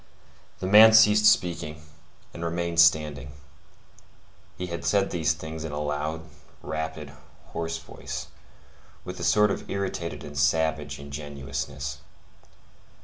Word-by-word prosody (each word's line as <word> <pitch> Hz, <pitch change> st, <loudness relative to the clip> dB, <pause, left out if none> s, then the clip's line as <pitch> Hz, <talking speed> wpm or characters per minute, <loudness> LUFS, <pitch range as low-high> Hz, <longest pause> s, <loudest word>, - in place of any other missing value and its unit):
The -, -, -5 dB
man 110 Hz, +3 st, +8 dB
ceased 105 Hz, -1 st, +6 dB
speaking, 85 Hz, -5 st, +1 dB, 0.5 s
and 85 Hz, -, -7 dB
remained 85 Hz, 0 st, -2 dB
standing. 75 Hz, -5 st, +3 dB, 1.2 s
He 90 Hz, -, -4 dB
had 85 Hz, -2 st, -6 dB
said 100 Hz, -1 st, +1 dB
these 80 Hz, -2 st, +1 dB
things 80 Hz, 0 st, -7 dB
in 80 Hz, -, -5 dB
a 75 Hz, -, -4 dB
loud, 75 Hz, +2 st, -3 dB, 0.4 s
rapid, 80 Hz, -2 st, -5 dB, 0.4 s
hoarse 80 Hz, 0 st, -3 dB
voice, 80 Hz, -, -7 dB, 0.8 s
with -, -, -7 dB
a -, -, -5 dB
sort 105 Hz, -1 st, +4 dB
of -, -, -5 dB
irritated 95 Hz, -4 st, -4 dB
and 75 Hz, -, -9 dB
savage 75 Hz, 0 st, 0 dB
ingenuousness. 70 Hz, -1 st, -6 dB
80 Hz, 120 wpm, -26 LUFS, 75-85 Hz, 1.2 s, man